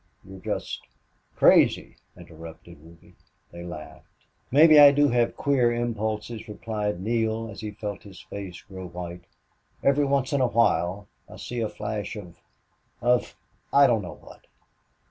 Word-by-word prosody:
"You're 95 0 -12
just - - -4 0.3
" - - -42
"Crazy," - - +4 0.2
interrupted 80 0 -12
Ruby. 85 +2 -18 0.4
They 85 0 -9
laughed. 85 -3 -10 0.4
"Maybe 155 +3 +7
I 145 -1 +10
do 145 0 +3
have 120 -1 +1
queer 130 -4 +2
impulses," 110 -1 -3
replied 105 -3 -3
Neale, 110 +1 -1
as 100 - -9
he 105 - -4
felt 105 -1 -6
his 95 -3 -13
face 95 -3 -9
grow 95 -1 -9
white. 85 0 -8 0.6
"Every 140 +1 +3
once 140 -1 0
in 140 - +2
a 130 - +3
while 100 -3 +1 0.2
I - - -11
see 120 - -6
a 110 - -1
flash 105 0 -5
of 90 -5 -10 0.6
of 125 +1 +1 0.4
I 140 0 +6
don't 120 -5 +2
know 90 - -8
what. - - -16
105 Hz, 150 wpm, -25 LUFS, 90-120 Hz, 0.6 s, I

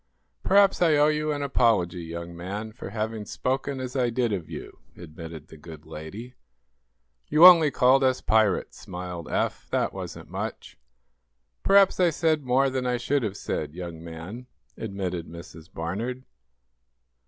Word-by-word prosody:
"Perhaps 200 -1 +4
I 165 -3 +5
owe 150 +1 +5
you 155 0 0
an 145 -1 -2
apology, 110 -10 +2
young 85 +1 -7
man, 100 +6 -5
for 110 - -9
having 110 +1 -3
spoken 135 +5 -2
as 130 0 -5
I 125 -2 +2
did 120 -2 0
of 90 -5 -4
you," - - -9 0.2
admitted 80 -2 -10
the 80 - -12
good 80 0 -12
lady. 100 +11 -9 0.9
"You 160 +3 +6
only 170 -4 +9
called 130 +1 +4
us 130 -1 +2
pirates," 110 -3 +1
smiled 90 -3 -7
Eph. - - -2
"That - - 0
wasn't - - -8
much." - - -5 0.9
"Perhaps 195 -1 +5
I 180 -2 +5
said 155 -2 +1
more 130 +2 +2
than 130 -1 -2
I 125 0 +1
should 135 +4 0
have 105 -3 -3
said, 75 - -4
young 85 -2 -7
man," 85 +9 -8 0.3
admitted 95 -5 -4
Mrs. 85 -1 -12
Barnard. 110 +10 -4
110 Hz, 155 wpm, -26 LUFS, 85-135 Hz, 0.9 s, only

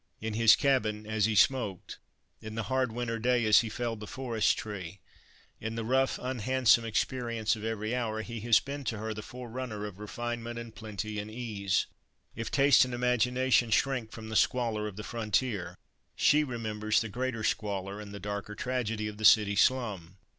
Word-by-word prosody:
In 110 0 -4
his 115 0 +6
cabin 110 -7 +1
as 110 -1 +1
he 110 -1 0
smoked, 105 -5 +1 0.4
in 110 -1 -7
the 115 - -2
hard 130 -2 +1
winter 115 0 -3
day 120 0 +2
as 105 -1 +7
he 115 - -1
felled 115 0 -3
the 105 - -8
forest 115 -5 0
tree, 95 -3 -6 0.6
in 110 +1 -4
the 115 -1 -3
rough, 130 +3 +2
unhandsome 125 -2 +2
experience 115 -1 -1
of 110 - -9
every 110 0 -2
hour, 110 -3 -2
he 115 0 -6
has 115 0 +4
been 140 +1 -6
to 115 - -2
her 110 +1 -3
the 110 - -6
forerunner 120 -2 -6
of 100 -2 -8
refinement 120 +2 -5
and 115 -1 -7
plenty 110 -1 -5
and 105 +1 -5
ease. 105 -4 -1 0.5
If 115 -1 -4
taste 135 -5 +5
and 125 -1 -3
imagination 125 0 +2
shrink 120 -1 +1
from 110 -1 -9
the 110 - -5
squalor 115 -3 +1
of 105 - -7
the 105 - -7
frontier, 110 -3 -2 0.4
she 150 +1 +4
remembers 110 -4 -1
the 115 - -2
greater 120 +1 -3
squalor 100 -1 -2
and 105 -1 -9
the 100 - -7
darker 100 +1 -5
tragedy 115 -3 -2
of 105 -1 -7
the - - -6
city 105 -1 +6
slum. 100 -7 +1
110 Hz, 180 wpm, -30 LUFS, 105-125 Hz, 0.6 s, as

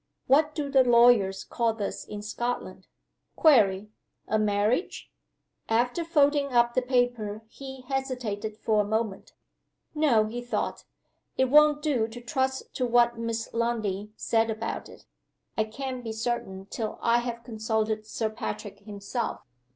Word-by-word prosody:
What 300 +3 +3
do 295 -2 -2
the 270 -2 +5
lawyers 235 -5 +5
call 230 -2 0
this 205 -3 -4
in 205 0 -7
Scotland? 240 +3 -4 0.5
(Query: 210 - +4 0.4
a 215 - +1
marriage?)" 210 - 0 0.6
After 245 +8 +1
folding 290 -3 +2
up 240 -1 +3
the 255 - +2
paper 245 -4 0
he 265 +3 -9
hesitated 250 -6 -3
for 215 -1 +2
a - - 0
moment. 215 -1 -2 0.6
"No!" 280 -9 +3
he 235 +3 -5
thought, 245 - -3 0.5
"It 260 -1 +2
won't 300 0 +6
do 260 -8 +1
to 230 +2 -9
trust 265 +2 -2
to 255 - +1
what 240 0 +3
Miss 230 -1 -3
Lundie 215 -4 -1
said 225 0 +1
about 220 +1 -4
it. - - -15 0.5
I 220 - +1
can't 255 +3 -5
be 225 -1 -4
certain 220 -4 -3
till 220 -2 -3
I 235 +1 +4
have 240 -1 -5
consulted 220 -2 -2
Sir 220 0 -2
Patrick 205 -2 -6
himself." 205 +3 -4
235 Hz, 145 wpm, -27 LUFS, 215-255 Hz, 0.6 s, won't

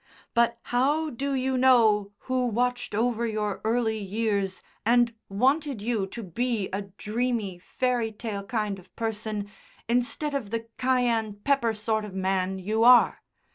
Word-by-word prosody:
"But 235 0 +3 0.2
how 295 +5 +2
do 275 +3 -2
you 260 0 0
know 220 -6 +4
who 255 -1 0
watched 245 0 -1
over 235 +1 +1
your 210 -2 -2
early 220 0 +1
years 200 -1 -1 0.2
and 235 +1 +3 0.2
wanted 270 +5 +1
you 215 -2 -1
to 230 +4 -7
be 220 +2 -1
a 195 - -1 0.2
dreamy, 220 -4 -2
fairy 245 +3 -1
tale 210 -2 -5
kind 210 -2 -2
of 185 - -20
person 215 -2 -3 0.4
instead 245 +5 0
of 265 -8 -2
the 230 +1 -3
cayenne 240 -4 +1
pepper 265 -6 +2
sort 220 0 -1
of 205 -3 -8
man 190 0 0
you 215 +4 0
are. 245 0 +6
225 Hz, 145 wpm, -27 LUFS, 210-245 Hz, 0.4 s, are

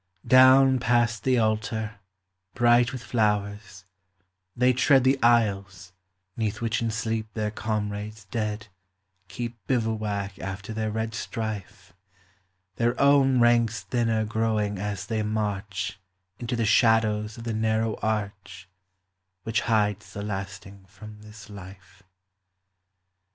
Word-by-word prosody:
Down 130 0 +6
past 120 -1 +1
the 130 -1 +2
altar, 110 -1 -1 0.6
bright 120 0 +4
with 130 -2 -7
flowers, 105 -4 -1 0.7
they 125 +1 +3
tread 130 +1 +4
The 130 +1 +2
aisles 100 -5 +1 0.4
'neath 110 -3 -2
which 115 -1 -1
in 115 - 0
sleep 110 0 -3
their 105 -1 -1
comrades 105 -1 -4
dead 105 -2 -3 0.6
Keep 120 +5 -5
bivouac 110 -5 -2
after 100 +3 -6
their 110 0 -2
red 110 +1 -3
strife, 100 -5 -6 0.8
Their 120 +1 0
own 140 -2 +4
ranks 115 -2 +3
thinner 115 -3 0
growing 110 -2 -1
as 105 0 -4
they 110 0 -2
march 105 -2 -3 0.4
Into 120 0 -3
the 115 -1 0
shadows 110 -1 +2
of 115 - -8
the 115 -1 -3
narrow 110 0 0
arch 100 -4 -4 0.8
Which 110 +2 0
hides 105 -2 0
the 100 - -5
lasting 100 -1 -6
from 105 +2 -13
this 105 -1 -13
life. 100 0 -13
110 Hz, 120 wpm, -26 LUFS, 105-115 Hz, 0.8 s, Down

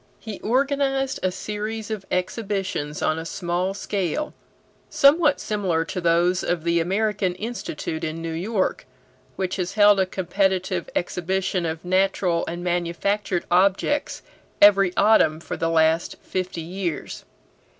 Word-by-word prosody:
He 220 -3 -7
organized 270 +2 0
a 185 - +1
series 215 +3 -5
of 205 -3 -5
exhibitions 185 -5 -2
on 155 - +1
a - - -5
small 180 +3 -2
scale, 200 - -2 0.6
somewhat 300 0 +4
similar 185 -6 -1
to 180 +2 -4
those 175 +2 +2
of 175 -2 -1
the 170 0 +2
American 195 +1 0
Institute 185 -7 -5
in 160 +1 -3
New 165 0 -4
York, 190 - -1 0.5
which 185 0 -2
has 180 -1 -2
held 205 -1 +6
a 190 - +2
competitive 185 0 -1
exhibition 180 0 -1
of 160 +1 -5
natural 185 -2 +1
and 175 +1 -5
manufactured 175 +2 -1
objects 195 +10 +2 0.4
every 195 -2 +6
autumn 200 -7 +4
for - - -5
the 165 - -1
last 160 0 +2
fifty 185 -2 -3
years. 175 0 -4
185 Hz, 130 wpm, -23 LUFS, 170-205 Hz, 0.6 s, held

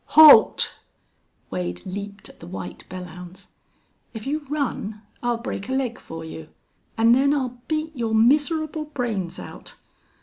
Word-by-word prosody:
"Halt!..." 305 -8 +8 0.7
Wade 90 -1 -3
leaped 200 +1 -6
at - - -17
the - - -11
white 90 0 -7
Belllounds. 180 +1 -9 0.7
"If 220 - -6
you 290 +1 -3
run 230 -7 -3 0.2
I'll 240 -1 0
break 230 -2 -5
a - - -1
leg 255 -2 -1
for 165 0 -8
you 160 -1 -9 0.5
an' 225 +1 +5
then 275 +4 +4
I'll 250 -3 -3
beat 310 0 -2
your 230 -3 -1
miserable 305 +6 +2
brains 230 - -3
out!... - - -10
230 Hz, 140 wpm, -24 LUFS, 185-280 Hz, 0.7 s, Halt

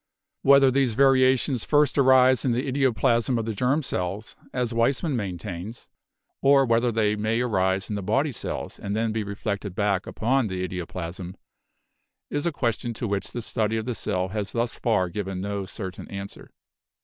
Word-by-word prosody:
Whether 140 -1 +6
these 130 -4 +1
variations 130 -2 +3
first 150 -1 +3
arise 130 -2 +5
in 125 - +1
the 125 +4 -1
idioplasm 130 -2 +1
of 115 - -2
the 110 - -2
germ 130 +8 +1
cells, 95 -1 -4 0.2
as 125 -2 -2
Weismann 135 +6 +1
maintains, 95 +1 -5 0.5
or 135 0 +5
whether 115 0 +2
they 105 -2 +1
may 110 +2 0
arise 95 -5 0
in 105 - -3
the 100 - -3
body 135 +10 +1
cells 120 - -5
and 100 +1 -3
then 110 0 0
be 110 0 -2
reflected 100 -1 -4
back 100 -2 0
upon 125 +2 +1
the 90 -1 -3
idioplasm, 90 +1 -6 1.0
is 145 +3 -1
a - - +1
question 120 -4 -2
to 115 +2 -3
which 100 -1 -2
the 120 - -5
study 110 0 -1
of 110 - -3
the 125 - -2
cell 95 -4 -2
has 105 0 -4
thus 115 0 -1
far 105 -6 +1
given 95 +1 -4
no 100 0 -3
certain 95 -1 -7
answer. 100 0 -8
110 Hz, 175 wpm, -25 LUFS, 100-130 Hz, 1.0 s, Whether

